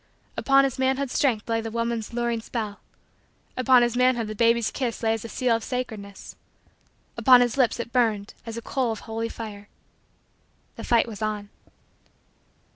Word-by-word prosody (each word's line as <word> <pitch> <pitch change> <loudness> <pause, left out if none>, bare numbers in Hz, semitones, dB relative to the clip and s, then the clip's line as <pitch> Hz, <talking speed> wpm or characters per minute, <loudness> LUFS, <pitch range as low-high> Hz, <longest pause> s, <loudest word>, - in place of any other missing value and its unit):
Upon 275 0 +4
his 270 -2 -1
manhood's 265 0 0
strength 235 -7 +1
lay 225 -1 0
the 225 - -5
woman's 230 -1 -2
luring 235 -1 -1
spell. 220 -3 -5 0.8
Upon 255 -1 +5
his 240 0 0
manhood 250 -2 +3
the 215 - -5
baby's 230 +1 +2
kiss 245 -4 -3
lay 225 0 +3
as 225 - -4
a 230 - -7
seal 245 -1 +1
of 225 - -3
sacredness 220 -6 -6 0.8
upon 250 -2 +7
his 240 -2 +1
lips 255 -3 +2
it 235 0 -5
burned 220 -5 +1
as 230 -1 -7
a 230 - -6
coal 255 -4 -1
of 220 - -5
holy 225 +1 -4
fire. 210 -3 -8 1.1
The - - -8
fight 235 -1 +3
was 220 -2 -8
on. 210 -1 -3
230 Hz, 170 wpm, -25 LUFS, 220-250 Hz, 1.1 s, upon